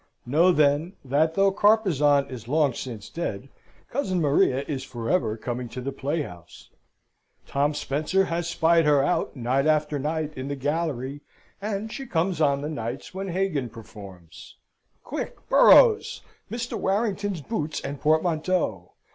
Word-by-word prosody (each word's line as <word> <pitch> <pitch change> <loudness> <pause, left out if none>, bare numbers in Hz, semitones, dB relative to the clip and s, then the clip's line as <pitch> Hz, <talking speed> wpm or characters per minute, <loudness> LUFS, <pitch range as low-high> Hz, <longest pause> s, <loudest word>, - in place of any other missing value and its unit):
Know, 160 +9 +4
then, 150 +2 +2
that 155 +5 +1
though 195 0 +4
Carpezan 175 -10 +3
is 115 -3 -8
long 145 -1 +2
since 115 -4 -7
dead, 135 -7 -5 0.4
cousin 195 -9 -1
Maria 140 -3 +2
is 135 -3 -3
for 120 -4 -5
ever 115 -12 +1
coming 120 +1 -4
to 125 - -7
the 135 +2 -4
playhouse. 140 - -5 0.7
Tom 145 +2 0
Spencer 155 +7 0
has 170 0 -2
spied 165 0 +3
her 145 -2 +4
out 165 +2 0
night 130 +3 0
after 150 -1 +1
night 155 +1 -2
in 130 +1 -5
the 140 - -3
gallery, 145 -1 -2 0.4
and 210 +1 -3
she 270 -1 -6
comes 170 -2 0
on 140 -2 +2
the 145 - -3
nights 120 -1 -5
when 195 +1 -4
Hagan 175 -8 -1
performs. 100 -6 -12 0.5
Quick, - - -6
Burroughs, 455 -3 +6 0.3
Mr. 235 +1 -4
Warrington's 200 -3 -1
boots 155 -4 -3
and 140 -1 -6
portmanteau! 155 - 0
150 Hz, 145 wpm, -25 LUFS, 135-180 Hz, 0.7 s, Burroughs